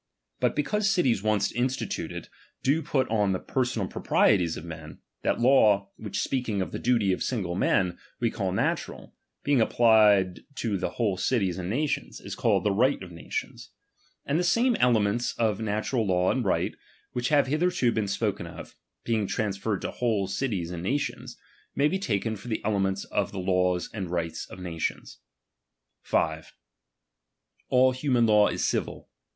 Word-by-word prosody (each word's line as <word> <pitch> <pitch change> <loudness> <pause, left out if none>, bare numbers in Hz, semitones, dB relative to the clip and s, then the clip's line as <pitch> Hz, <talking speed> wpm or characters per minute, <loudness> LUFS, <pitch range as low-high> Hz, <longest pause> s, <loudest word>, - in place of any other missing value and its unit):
But - - +1
because 210 +8 +1
cities 135 - +2
once 105 -2 +1
instituted 130 +2 -3 0.4
do 145 +5 +2
put 135 -4 0
on 105 -3 +2
the 95 - -1
personal 125 -6 -1
proprieties 90 -5 +2
of 80 - -8
men, 80 -2 -9 0.2
that - - 0
law, 105 -6 +4
which 105 -2 -4
speaking 125 -6 -1
of 95 - -2
the - - -4
duty 115 -6 +2
of - - -4
single 100 -9 -2
men 90 -1 +1 0.2
we 115 -2 +1
call 95 -4 -2
na 95 - +2
tural, - - -9 0.3
being 140 -4 +3
applied 105 -5 +4 0.2
to 105 -7 -2
whole 100 0 -1
cities 95 -3 0
and 90 0 -4
nations, 140 +7 -2
is - - -7
called - - +1
t'he''rigkt 105 +4 +2
of 90 - -10
natioits. 85 - -6 0.6
And 145 +4 +1
the - - +1
same 235 +7 +3
elements 120 -1 +2
of 110 -3 +1
natural 110 +2 -1
law 90 -1 +2
and 130 - 0
right, 95 - 0 0.4
which 125 0 -1
have 145 -2 +4
hitherto 155 -2 +1
been 110 -3 -1
spoken 100 -3 -2
of, 85 - -10 0.3
being 110 -3 0
transferred 105 -2 -2
to - - -2
whole 110 -5 0
cities 95 -3 -2
and 85 -1 -5
nations, 135 +11 -3 0.4
may 140 - +3
be 190 +5 -1
taken 110 - -1
for 105 +4 -11
the 110 -3 -3
elements 95 -2 0
of 100 -2 -2
the 100 - -7
laws 90 -1 +1
and 95 -5 -4
right 85 -2 -2
of - - -10
nations. 85 -3 -4 0.8
5. 80 0 -1 1.2
All 130 +1 +5
human 130 -2 +1
law 105 -2 +5
is - - -1
civil. - - -2
105 Hz, 165 wpm, -27 LUFS, 95-125 Hz, 1.2 s, All